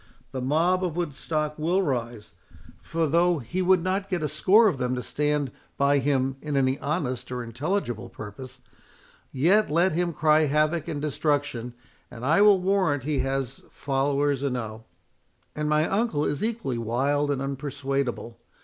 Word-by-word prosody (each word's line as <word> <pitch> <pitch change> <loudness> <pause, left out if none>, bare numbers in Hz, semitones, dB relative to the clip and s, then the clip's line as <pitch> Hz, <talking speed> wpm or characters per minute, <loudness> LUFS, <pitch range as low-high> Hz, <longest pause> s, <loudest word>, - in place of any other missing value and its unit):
The 130 - -4
mob 165 +8 +2
of 175 -4 -2
Woodstock 155 -1 -2
will 175 +5 +1
rise; 120 - -3 0.5
for 165 0 -1
though 170 +3 +3
he 155 +8 -3
would 185 -1 +3
not 190 +1 -1
get 180 -5 -1
a - - +1
score 190 +10 +4
of 160 -10 0
them 125 0 0
to 125 - -4
stand 150 -2 -1 0.3
by 140 0 +3
him 135 -1 0
in 150 -2 -2
any 130 0 +1
honest 140 -5 -3
or 125 -1 -3
intelligible 120 - -3
purpose, 125 +5 -10 0.7
yet 185 +11 +3
let 170 +5 +3
him 175 +2 0
cry 155 0 +3
havoc 155 +2 +1
and 145 - -3
destruction, 145 -5 -1 0.3
and 120 0 -8
I 165 +8 +4
will 205 -2 +6
warrant 185 -7 +1
he 145 -1 -1
has 135 -1 -2
followers 140 0 0
enow. 115 -5 -3 0.7
And 150 0 -2
my 150 +1 +2
uncle 195 -8 0
is 145 +4 -2
equally 215 - -2
wild 140 +6 0
and 140 -2 0
unpersuadable. 135 -3 -3
145 Hz, 160 wpm, -26 LUFS, 130-165 Hz, 0.7 s, will